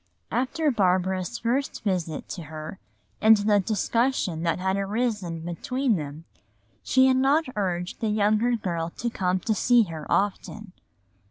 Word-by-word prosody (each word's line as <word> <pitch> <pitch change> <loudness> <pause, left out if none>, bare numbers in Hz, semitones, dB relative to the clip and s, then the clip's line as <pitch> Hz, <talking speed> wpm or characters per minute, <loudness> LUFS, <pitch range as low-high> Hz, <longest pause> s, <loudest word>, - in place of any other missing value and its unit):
After 280 +5 0
Barbara's 185 0 0
first 260 +4 -2
visit 175 -7 -2
to 170 -4 -6
her 155 +4 -8 0.4
and 220 0 +7
the 205 0 +3
discussion 215 -3 0
that 165 0 0
had 190 +1 0
arisen 200 -4 -2
between 230 - -1
them, 150 0 -6 0.6
she 260 0 +3
had 260 0 +4
not 280 +5 +3
urged 180 -3 -2
the 220 - 0
younger 215 +3 +2
girl 170 -6 -3
to 235 - -2
come 185 -3 0
to 220 - 0
see 240 +3 +4
her 160 -5 -7
often. 205 0 -1
205 Hz, 145 wpm, -25 LUFS, 175-235 Hz, 0.6 s, and